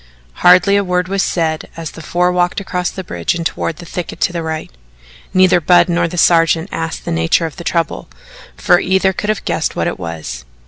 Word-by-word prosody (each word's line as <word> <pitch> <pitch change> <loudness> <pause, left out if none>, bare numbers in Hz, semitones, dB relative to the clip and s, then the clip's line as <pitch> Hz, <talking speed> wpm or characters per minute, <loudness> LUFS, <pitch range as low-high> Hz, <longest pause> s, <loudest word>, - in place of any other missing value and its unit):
Hardly 180 +3 +6
a 200 - +2
word 180 -1 0
was 195 0 0
said 160 -4 -1
as 165 -2 -5
the - - -11
four 175 +3 +1
walked 180 +3 0
across 180 -2 -2
the 190 - -7
bridge 85 - -2
and 170 -1 -4
toward 165 0 -3
a 175 - -9
thicket 175 0 -6
to 180 - +1
the 170 - -2
right. 160 - -5 0.6
Neither 185 -1 +4
Budd 180 +3 +4
nor 170 0 +1
the 175 - -7
sergeant 165 +1 +3
asked 165 0 -4
the - - -3
nature 80 - +1
of 160 - -7
the 170 - -7
trouble, 165 -1 -2 0.5
for 175 - +4
either 190 0 +1
could 210 +3 -4
have 215 - -1
guessed - - -1
what - - -1
it - - -3
was. 80 -7 -6
175 Hz, 215 wpm, -16 LUFS, 165-180 Hz, 0.6 s, Hardly